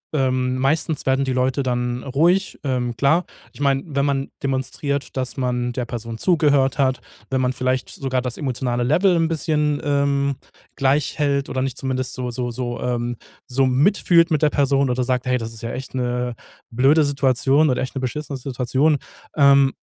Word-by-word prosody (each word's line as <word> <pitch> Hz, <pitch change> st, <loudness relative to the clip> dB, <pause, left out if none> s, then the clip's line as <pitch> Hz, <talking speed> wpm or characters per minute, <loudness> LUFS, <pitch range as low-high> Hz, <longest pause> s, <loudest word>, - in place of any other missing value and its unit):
ähm, 130 Hz, -2 st, +1 dB
meistens 150 Hz, +3 st, 0 dB
werden 135 Hz, +1 st, +2 dB
die 130 Hz, -, -1 dB
Leute 130 Hz, +2 st, +1 dB
dann 125 Hz, -1 st, -1 dB
ruhig, 170 Hz, +9 st, +1 dB
ähm, 125 Hz, -3 st, -1 dB
klar. 150 Hz, +8 st, +2 dB, 0.3 s
Ich -, -, -16 dB
mein, 135 Hz, -1 st, +2 dB
wenn 140 Hz, 0 st, +2 dB
man 140 Hz, -1 st, -1 dB
demonstriert, 135 Hz, +1 st, -2 dB
dass 130 Hz, -1 st, -2 dB
man 125 Hz, -1 st, -1 dB
der 125 Hz, 0 st, -3 dB
Person 115 Hz, -1 st, -6 dB
zugehört 145 Hz, -3 st, +2 dB
hat, 130 Hz, -2 st, +1 dB, 0.3 s
wenn 130 Hz, -1 st, 0 dB
man 125 Hz, 0 st, +1 dB
vielleicht 130 Hz, 0 st, -1 dB
sogar 130 Hz, -2 st, -2 dB
das 125 Hz, -2 st, -3 dB
emotionale 125 Hz, -3 st, -1 dB
Level 175 Hz, +9 st, +3 dB
'n 165 Hz, -1 st, +2 dB
bisschen, 150 Hz, -2 st, 0 dB
ähm, 140 Hz, -1 st, +1 dB, 0.4 s
gleich 135 Hz, +1 st, +1 dB
hält 140 Hz, -2 st, +1 dB
oder 130 Hz, -, -2 dB
nicht 130 Hz, -1 st, -3 dB
zumindest 130 Hz, -1 st, -2 dB
so 125 Hz, -1 st, -4 dB
so 120 Hz, 0 st, -3 dB
so, 120 Hz, -1 st, -4 dB
ähm, 120 Hz, -1 st, -2 dB, 0.3 s
so 135 Hz, +2 st, +2 dB
mitfühlt 170 Hz, +5 st, +3 dB
mit 155 Hz, -2 st, +2 dB
der 150 Hz, -, +5 dB
Person 140 Hz, -1 st, +2 dB
oder 125 Hz, +1 st, 0 dB
sagt: 125 Hz, 0 st, -1 dB
„Hey, 125 Hz, 0 st, +1 dB
das 115 Hz, -1 st, -6 dB
ist 115 Hz, -, -11 dB
ja 115 Hz, -, -3 dB
echt 130 Hz, +1 st, -7 dB
'ne 125 Hz, -1 st, -2 dB, 0.3 s
blöde 135 Hz, +6 st, +4 dB
Situation 140 Hz, +1 st, +2 dB
oder 125 Hz, -, 0 dB
echt 130 Hz, +1 st, -4 dB
'ne 135 Hz, -, -2 dB
beschissene 140 Hz, +3 st, -4 dB
Situation." 135 Hz, +3 st, +1 dB, 0.4 s
Ähm, 140 Hz, -2 st, +5 dB
130 Hz, 180 wpm, -21 LUFS, 125-140 Hz, 0.4 s, der